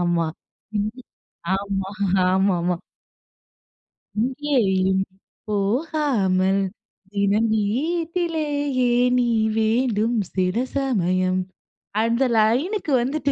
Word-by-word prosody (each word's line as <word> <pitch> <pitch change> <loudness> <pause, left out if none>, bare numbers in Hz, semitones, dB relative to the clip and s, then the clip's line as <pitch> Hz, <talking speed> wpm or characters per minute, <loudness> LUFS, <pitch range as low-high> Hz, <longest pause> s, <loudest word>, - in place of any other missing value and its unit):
ஆமா, 175 -1 +1 1.3
ஆமா, 195 -1 -3 0.4
ஆமாமா. 180 -2 +2 1.5
"இங்கேயும் 225 -9 +1 0.5
போகாமல் 205 - +1 0.5
தினம் 205 +2 +2
வீட்டிலேயே 290 - 0 0.3
நீ 245 - +2 0.3
வேண்டும். 225 0 +1 0.2
சில 185 +1 0 0.2
சமயம்" 185 -8 +1 0.6
அந்த 230 +3 +2
லைனுக்கு 290 - +1
வந்துட்டு 280 +2 -1
220 Hz, 65 wpm, -23 LUFS, 190-275 Hz, 1.5 s, ஆமாமா